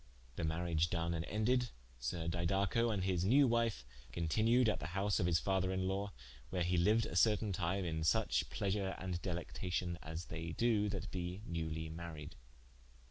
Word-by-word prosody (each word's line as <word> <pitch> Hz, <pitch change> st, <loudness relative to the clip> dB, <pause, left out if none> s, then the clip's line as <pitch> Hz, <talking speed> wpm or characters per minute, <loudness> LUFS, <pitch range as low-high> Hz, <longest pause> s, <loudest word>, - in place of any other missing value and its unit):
The -, -, -3 dB
mariage 80 Hz, 0 st, +1 dB
done 85 Hz, -1 st, 0 dB
and 80 Hz, 0 st, -2 dB
ended, 120 Hz, +4 st, +1 dB, 0.3 s
Sir 80 Hz, +8 st, -3 dB
Didaco 95 Hz, +7 st, +1 dB
and 100 Hz, -3 st, -1 dB
his 90 Hz, -2 st, +1 dB
newe 135 Hz, +9 st, +6 dB
wife 115 Hz, -, +1 dB, 0.3 s
continued 110 Hz, -, +3 dB
at 110 Hz, -, +1 dB
the 75 Hz, -, -4 dB
house 100 Hz, +1 st, +2 dB
of 85 Hz, -, +2 dB
his 85 Hz, -2 st, +4 dB
father 95 Hz, 0 st, +1 dB
in 95 Hz, 0 st, 0 dB
lawe, 100 Hz, +1 st, -1 dB, 0.4 s
where 90 Hz, -2 st, 0 dB
he 90 Hz, +1 st, +1 dB
liued 105 Hz, +6 st, +4 dB
a -, -, -5 dB
certaine 105 Hz, +1 st, +3 dB
time 90 Hz, +2 st, -1 dB
in 80 Hz, -2 st, -2 dB
suche 80 Hz, -, +2 dB
pleasure 95 Hz, -1 st, -1 dB
and 90 Hz, -2 st, -3 dB
delectation 90 Hz, -1 st, -3 dB
as 80 Hz, +2 st, -6 dB
they 80 Hz, +1 st, -5 dB
do 110 Hz, -2 st, +2 dB
that 100 Hz, -2 st, -4 dB
be 90 Hz, +2 st, -4 dB
newly 80 Hz, -3 st, -3 dB
maried. 80 Hz, -1 st, -7 dB
90 Hz, 175 wpm, -36 LUFS, 85-105 Hz, 0.4 s, newe